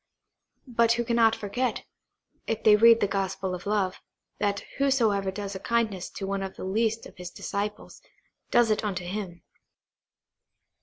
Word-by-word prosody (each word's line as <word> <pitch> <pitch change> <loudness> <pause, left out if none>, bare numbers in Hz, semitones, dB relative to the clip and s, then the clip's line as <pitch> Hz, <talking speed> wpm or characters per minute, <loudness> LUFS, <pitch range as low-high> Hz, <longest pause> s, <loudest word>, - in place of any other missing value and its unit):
but 235 -2 +3
who 235 0 0
cannot 230 -1 +4
forget, 225 +4 -2 0.6
if 225 - -2
they 215 -1 +7
read 230 +2 +7
the 205 - +3
gospel 195 -1 -2
of 180 +2 -6
love, 200 -3 0 0.4
that 200 -1 0 0.2
whosoever 225 -8 +2
does 200 +1 -5
a 190 - -5
kindness 215 -4 -1
to 195 - -6
one 195 0 -2
of 190 0 -5
the - - -8
least 225 +3 0
of - - -13
His 180 -1 -7
disciples, 205 +3 -5 0.5
does 240 -2 +4
it 215 - +1
unto 185 -4 -3
Him. 180 -2 -5
210 Hz, 155 wpm, -27 LUFS, 195-230 Hz, 0.6 s, they